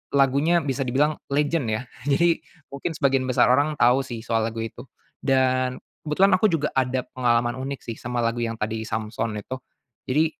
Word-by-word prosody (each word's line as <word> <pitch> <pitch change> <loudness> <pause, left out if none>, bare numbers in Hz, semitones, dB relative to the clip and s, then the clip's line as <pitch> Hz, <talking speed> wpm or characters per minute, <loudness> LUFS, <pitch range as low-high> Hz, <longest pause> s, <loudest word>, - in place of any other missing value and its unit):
lagunya 140 +5 +3
bisa 135 -1 -2
dibilang 145 +5 +1
legend 145 -1 0
ya. 110 - -4 0.2
Jadi 165 +4 +3 0.3
mungkin 140 +4 -4
sebagian 135 -2 +1
besar 125 -1 +4
orang 145 +4 +2
tahu 125 0 +4
sih, 120 -4 -7
soal 115 -1 0
lagu 115 0 -4
itu. 115 +4 -8 0.3
Dan 130 -1 +2 0.3
kebetulan 190 +7 +4
aku 215 - +5
juga 160 -6 0
ada 130 -1 0
pengalaman 120 -1 0
unik 135 +1 -5
sih, 115 - -5
sama 120 -1 -2
lagu 115 +1 0
yang 115 0 -2
tadi 110 +1 -2
Samson 110 0 -3
itu. 130 +5 -6 0.5
Jadi 150 +5 +3
130 Hz, 175 wpm, -24 LUFS, 120-145 Hz, 0.5 s, aku